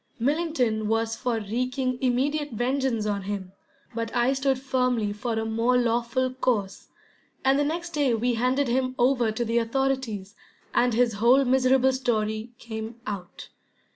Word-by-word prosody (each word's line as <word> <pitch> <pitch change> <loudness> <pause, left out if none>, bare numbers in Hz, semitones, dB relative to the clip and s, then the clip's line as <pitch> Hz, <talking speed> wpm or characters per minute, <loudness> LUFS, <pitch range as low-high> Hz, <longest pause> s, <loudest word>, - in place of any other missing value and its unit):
Millington 255 -5 0
was 225 +1 0
for 240 -3 -1
wreaking 255 +4 -2
immediate 275 +3 0
vengeance 245 -1 0
on 205 -1 -1
him, 195 -1 -5 0.4
but 230 0 -3
I 245 +2 +3
stood 270 -1 +1
firmly 250 -5 0
for 230 +3 -3
a 220 0 -1
more 230 +3 +2
lawful 245 +2 0
course, 220 -7 -1 0.6
and 270 +1 +4
the - - +3
next 340 +4 -3
day 285 -7 +2
we 240 +2 0
handed 255 +4 +1
him 255 +1 0
over 245 -2 +3
to 235 +2 -2
the 230 +1 +1
authorities, 230 -5 -1 0.4
and 245 -1 +2
his 240 -1 +3
whole 260 +4 +5
miserable 260 +1 +3
story 220 -3 -1
came 225 0 -7
out. 195 -5 -7
245 Hz, 150 wpm, -26 LUFS, 225-265 Hz, 0.6 s, whole